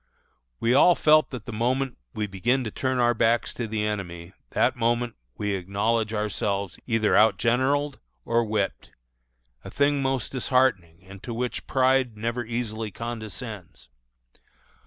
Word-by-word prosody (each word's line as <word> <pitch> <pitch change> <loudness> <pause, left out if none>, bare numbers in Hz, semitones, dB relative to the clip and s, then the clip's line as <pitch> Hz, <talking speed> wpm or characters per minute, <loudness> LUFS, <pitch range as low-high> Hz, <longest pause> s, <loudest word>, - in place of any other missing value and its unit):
We 115 +2 +2
all 175 +6 +6
felt 155 -2 +4
that 125 - -7
the 120 - -6
moment 125 +4 0 0.2
we 105 - -2
begin 115 +7 0
to 110 - -4
turn 130 +3 -1
our 120 -1 +3
backs 115 0 +1
to 115 - -4
the 105 -1 -1
enemy, 85 -4 -5 0.2
that - - +2
moment 120 0 0 0.2
we 105 -1 -1
acknowledge 100 +4 0
ourselves 100 -2 -2
either 115 -3 +2
outgeneraled 130 +6 +2 0.3
or 115 0 +2
whipped, 105 -3 -2 0.7
a - - -8
thing 140 0 +1
most 135 -3 -1
disheartening, 120 -10 +1
and 95 0 -12
to 120 - -6
which 125 +1 -3
pride 130 -3 +2
never 115 +3 -2
easily 115 -2 -3
condescends. 110 - -7
115 Hz, 140 wpm, -25 LUFS, 105-125 Hz, 0.7 s, all